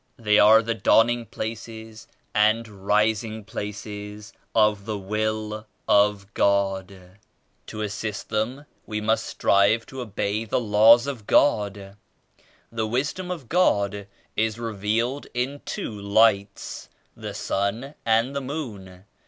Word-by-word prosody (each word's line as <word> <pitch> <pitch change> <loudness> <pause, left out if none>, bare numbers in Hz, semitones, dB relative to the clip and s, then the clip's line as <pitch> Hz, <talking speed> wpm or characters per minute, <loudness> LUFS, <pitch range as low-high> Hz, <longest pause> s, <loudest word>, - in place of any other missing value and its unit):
They 105 -2 +3
are 110 +2 +7
the 115 +1 -1
dawning 115 +1 +3
places 110 0 -7 0.3
and 110 +2 +3 0.2
rising 110 +1 +1
places 105 0 -7 0.2
of 105 -2 +3
the 110 -1 -3
Will 110 +2 -3 0.2
of 105 0 +5
87 95 - -21
God. 95 -1 0 0.7
To 110 - -6
assist 105 0 -4
them 115 +7 -2 0.2
we 105 -1 -3
must 110 +1 0
strive 100 +3 +2
to 130 -1 -8
obey 105 -1 -2
the 110 - -1
Laws 115 +2 +6
of 130 -7 -6
God. 100 -6 +2 0.7
The 110 -1 -2
Wisdom 140 +10 -2
of 165 -9 -5
God 100 - +1 0.3
is 110 0 0
re 115 -2 -4
vealed 115 +7 -1
in 135 +4 -2
two - - -4
Lights, 100 -1 +1 0.3
the - - -7
*Sun' 110 +8 -2
and 115 +4 +2
the 140 - -1
*Moon.' 105 - -7
110 Hz, 130 wpm, -24 LUFS, 105-115 Hz, 0.7 s, are